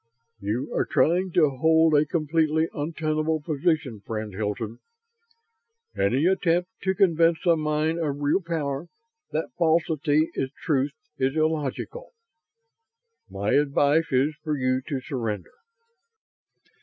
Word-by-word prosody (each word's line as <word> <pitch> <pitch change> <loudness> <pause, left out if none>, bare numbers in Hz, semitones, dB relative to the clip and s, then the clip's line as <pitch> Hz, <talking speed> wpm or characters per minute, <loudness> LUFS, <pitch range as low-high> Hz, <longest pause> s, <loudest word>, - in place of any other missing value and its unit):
"You 115 +8 -3
are - - +2
trying 180 +4 +2
to 155 -5 +4
hold 160 +1 +4
a 150 0 +4
completely 160 0 +1
untenable 155 +1 -1
position, 150 - -1
friend 110 -1 -5
Hilton. 110 +3 -4 1.2
Any 130 +10 +1
attempt 180 0 +1
to 190 0 0
convince 170 -3 +3
a 170 -1 +5
mind 155 +1 0
of 145 -3 -2
real 145 +6 +1
power 160 -3 -3 0.4
that 160 - -2
falsity 160 -2 +2
is 135 - -2
truth 140 -3 +1 0.3
is 135 +2 +1
illogical. 155 - -2 1.2
My 100 +2 -2
advice 145 +2 +2
is 135 +4 +2
for 155 -2 -1
you 130 0 +1
to 140 -4 -3
surrender." 115 - -4
155 Hz, 120 wpm, -25 LUFS, 135-165 Hz, 1.2 s, a